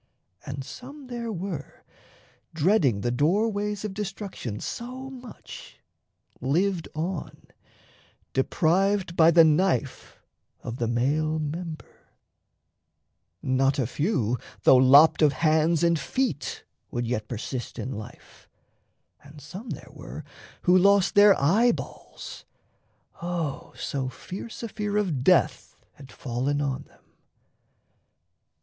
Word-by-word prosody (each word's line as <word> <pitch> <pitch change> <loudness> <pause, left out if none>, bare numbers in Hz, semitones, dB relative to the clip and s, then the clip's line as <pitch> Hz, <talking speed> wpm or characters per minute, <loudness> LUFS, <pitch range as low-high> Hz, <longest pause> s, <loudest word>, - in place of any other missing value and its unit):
And 135 0 -4
some 265 - -10
there 240 -2 -5
were, 180 -6 -6 0.7
Dreading 155 - +3
the 120 - 0
doorways 205 - 0
of 205 - -4
destruction 195 - -5
So 255 +3 -6
much, 250 -3 -11 0.6
lived 170 +6 0
on, 170 +2 -4 0.9
deprived 180 +6 +1
by 165 -1 +6
the 170 0 +7
knife 160 -3 +1 0.4
Of 115 - -5
the 120 - -1
male 145 +7 +1
member; 155 +1 -6 1.4
not 135 +2 +2
a 130 - +1
few, 125 - 0 0.2
though - - +7
lopped 140 +6 +7
Of 150 -2 +5
hands 160 +3 +2
and 170 -2 +3
feet, 255 - -2 0.3
would 120 0 -2
yet 110 -2 -2
persist 120 +2 -5
in 130 - -4
life, 110 -3 -11 0.7
And 145 +1 -14
some 185 - -9
there - - -7
were - - -9 0.4
who 180 - +5
lost 195 +1 +4
their 205 -1 +7
eyeballs: 215 - 0 0.8
O 170 -4 -3
So 135 -2 -3
fierce 200 - -8
a - - -2
fear 210 -1 -3
of 170 -11 0
death - - +2 0.2
had 135 -3 -14
fallen 130 +3 -2
on 135 -2 -2
them! - - -26
160 Hz, 115 wpm, -26 LUFS, 135-200 Hz, 1.4 s, the